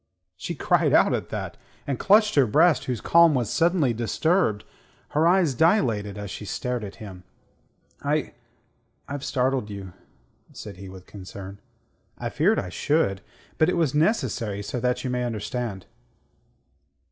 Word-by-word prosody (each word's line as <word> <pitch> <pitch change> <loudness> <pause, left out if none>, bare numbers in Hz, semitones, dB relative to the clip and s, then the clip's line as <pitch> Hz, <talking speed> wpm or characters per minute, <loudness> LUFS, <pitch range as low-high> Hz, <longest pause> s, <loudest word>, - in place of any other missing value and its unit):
She - - -5
cried - - +2
out - - +5
at - - -3
that, - - -5 0.3
and 140 -3 -3
clutched 210 +1 +4
her 140 -4 +4
breast 140 +6 +3
whose 125 -4 -3
calm 170 -2 +5
was 120 -4 -1
suddenly 165 -7 +2
disturbed. 120 - +1 0.5
Her 155 +3 +2
eyes 175 -5 +3
dilated 115 - +1
as 100 -1 -6
she - - -7
stared 125 +3 -3
at 100 - -7
him. 95 -5 -10 0.8
"I... - - -1 0.7
I've 145 -1 -5
startled 130 -5 0
you," 100 -3 -8 0.6
said 100 -3 -9
he, 95 0 -9
with 95 -1 -12
concern. 100 0 -10 0.6
"I - - -4
feared - - +2
I 90 - -2
should. 100 - 0 0.4
But 155 - +4
it - - 0
was 160 -5 +1
necessary 130 - 0
so 125 +5 -4
that 125 +1 -1
you 130 - -2
may 125 0 -1
understand." 115 -3 -4
125 Hz, 150 wpm, -25 LUFS, 105-155 Hz, 0.8 s, out